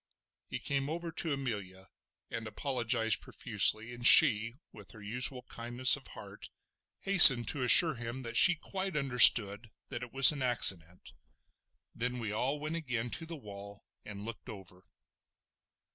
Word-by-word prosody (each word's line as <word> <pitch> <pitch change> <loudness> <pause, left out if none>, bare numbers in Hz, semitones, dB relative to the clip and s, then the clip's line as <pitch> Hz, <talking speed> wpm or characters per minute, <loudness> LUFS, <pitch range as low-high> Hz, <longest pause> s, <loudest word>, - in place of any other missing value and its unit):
He - - -9
came 140 0 -6
over 170 +1 -9
to 160 0 -6
Amelia 100 -9 -9 0.4
and 115 -1 -9
apologised 115 -2 -5
profusely, 110 +3 -2
and 120 0 -14
she 115 +2 +4 0.2
with 105 -4 -17
her 110 - -18
usual 125 +4 -6
kindness 120 +2 -3
of 140 - -13
heart 100 -1 -15 0.5
hastened 135 - +6
to 145 - -6
assure 160 +6 +4
him 120 +1 -11
that 115 -1 -10
she 180 +8 +4
quite 190 +1 -9
understood 115 -5 +3 0.2
that 120 - -9
it 125 -1 -12
was 135 +2 +4
an 145 -3 -10
accident. 95 -9 -2 0.8
Then 125 +1 -6
we 115 -3 -8
all 130 +7 -6
went 155 +3 -8
again 125 -6 -8
to 165 - -9
the 165 - -10
wall 100 -4 -16 0.2
and 105 0 -13
looked 115 +2 -13
over. 95 -4 -14
120 Hz, 150 wpm, -27 LUFS, 105-140 Hz, 0.8 s, hastened